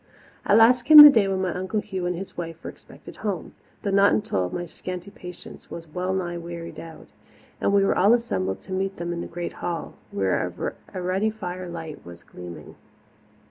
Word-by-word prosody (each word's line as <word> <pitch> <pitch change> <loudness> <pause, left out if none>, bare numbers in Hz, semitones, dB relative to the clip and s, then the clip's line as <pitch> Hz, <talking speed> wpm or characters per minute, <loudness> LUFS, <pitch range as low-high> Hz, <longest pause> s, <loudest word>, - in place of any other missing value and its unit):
At 205 - +5
last 240 +2 +6
came 305 +5 +7
the 295 0 +13
day 220 -6 +3
when 190 -1 -1
my 180 -3 -1
Uncle 185 +4 -2
Hugh 190 -3 -4
and 180 - -1
his 190 +3 -8
wife 165 -1 -7
were - - -6
expected - - -15
home - - -4 0.3
though 200 - -1
not 200 +1 +5
until 95 - 0
my 175 - -4
scanty 180 +3 -7
patience 180 -3 -11
was 165 - -8
well 180 +4 -3
nigh 175 -2 -2
wearied 170 0 -8
out 165 -1 -11 0.5
and - - +2
we 200 -1 +4
were - - +2
all 205 +6 +5
assembled 95 - -2
to - - -13
meet 195 +1 -2
them 175 0 -3
in 170 - -4
the - - -6
great 175 0 -6
hall, 170 -1 -4 0.2
where 95 -2 -2 0.2
a 185 - -5
ruddy 185 +4 0
firelight 180 -6 -7
was 85 0 -12
gleaming. 90 -1 -11
180 Hz, 195 wpm, -24 LUFS, 170-200 Hz, 0.5 s, the